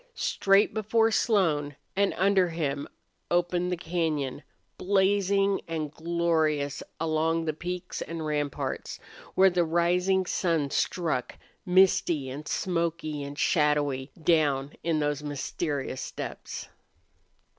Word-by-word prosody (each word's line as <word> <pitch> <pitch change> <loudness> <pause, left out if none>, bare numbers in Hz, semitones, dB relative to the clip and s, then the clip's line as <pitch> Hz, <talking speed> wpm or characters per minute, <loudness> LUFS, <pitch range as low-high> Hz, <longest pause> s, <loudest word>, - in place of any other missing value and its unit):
Straight 195 - +3
before 225 +1 +2
Slone 160 - +1 0.2
and 200 0 +2
under 190 -1 +3
him 145 -4 -2 0.4
opened 175 +1 +1
the 180 - -1
cañon, 160 -6 -2 0.3
blazing 195 0 +2
and 155 -3 -3
glorious 160 -4 0 0.2
along 165 +1 +1
the 155 - 0
peaks 180 +3 -5
and 165 -1 -5
ramparts, 145 -2 -3 0.4
where 190 0 +6
the 175 0 +2
rising 180 +3 +2
sun 165 -7 0
struck, 155 -10 -1 0.3
misty 180 -6 +3
and 145 +3 -7
smoky 165 -4 -1
and 140 0 -7
shadowy 150 -5 +1
down 145 -4 +2
in 165 -1 +1
those 145 -1 -1
mysterious 145 -1 -3
depths. - - -6
165 Hz, 110 wpm, -28 LUFS, 150-180 Hz, 0.4 s, where